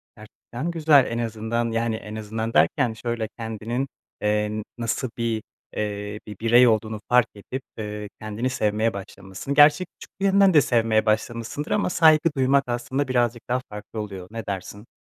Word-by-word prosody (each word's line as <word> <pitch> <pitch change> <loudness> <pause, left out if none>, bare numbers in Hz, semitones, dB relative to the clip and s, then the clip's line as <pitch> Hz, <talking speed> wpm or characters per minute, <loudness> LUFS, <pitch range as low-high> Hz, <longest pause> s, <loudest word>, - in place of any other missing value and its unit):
Gerçekten 120 +7 -7
güzel, 155 -5 +5
en 115 - -2
azından, 115 +1 -2
yani, 115 0 0
en 105 -1 -7
azından 110 +1 -4
derken 125 -6 +3
şöyle: 115 0 -3
Kendinin, 115 +3 -3 0.3
eee, 105 0 0
nasıl 120 +2 -2
bir, 115 -2 -1 0.3
eee, 105 0 -3
bir 105 -2 -9
birey 120 +2 +6
olduğunu 110 -1 +1
fark 125 -1 +5
edip, 125 +6 -6 0.2
eee, 105 -1 -5
kendini 110 +4 -2
sevmeye 110 -2 0
başlamışsın. 95 +5 -6
Gerçi 150 +5 +6
küçüklüğünden 195 +1 +1
de 150 - +7
sevmeye 115 -4 +2
başlamışsındır 115 +6 -1
ama 205 - +1
saygı 160 -2 +5
duymak 135 +1 +3
aslında 125 +3 -2
birazcık 120 -2 0
daha 125 +1 +1
farklı 105 +1 -8
oluyor, 95 -3 -7
ne 115 0 -6
dersin? 100 +2 -6
115 Hz, 150 wpm, -24 LUFS, 105-130 Hz, 0.3 s, de